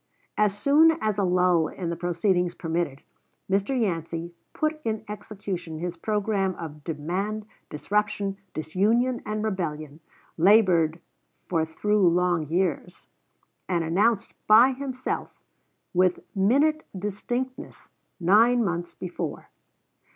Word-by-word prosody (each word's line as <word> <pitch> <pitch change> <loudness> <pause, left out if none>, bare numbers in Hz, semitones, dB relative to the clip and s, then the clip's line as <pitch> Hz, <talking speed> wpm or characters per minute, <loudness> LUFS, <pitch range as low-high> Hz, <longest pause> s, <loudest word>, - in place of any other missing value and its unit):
As 210 -1 +1
soon 310 +7 +5
as 215 -5 -1
a - - +2
lull 180 -3 +3
in 175 -3 -5
the - - -2
proceedings 175 +1 0
permitted, 165 -4 -3 0.4
Mr. 200 +7 0
Yancey 170 -4 -2 0.2
put 310 0 -2
in 220 -1 -2
execution 195 -5 -6
his 175 +2 -4
programme 200 0 -1
of 150 -3 -8
demand, 185 +8 -3 0.2
disruption, 200 +3 -1 0.2
disunion, 220 +11 +1
and 215 0 -2
rebellion, 155 -7 -3 0.4
labored 175 -4 +4 0.5
for 165 -3 +1
through 205 +3 +2
long 175 -2 +1
years, 180 +2 -2 0.6
and 170 -2 +1
announced 200 +7 +1
by 230 +5 +7
himself, 260 -1 -4 0.5
with 180 0 +2
minute 280 +11 +3
distinctness, 240 +6 -4 0.3
nine 225 +7 +5
months 175 -2 -3
before. 175 -4 -5
190 Hz, 110 wpm, -26 LUFS, 170-215 Hz, 0.6 s, by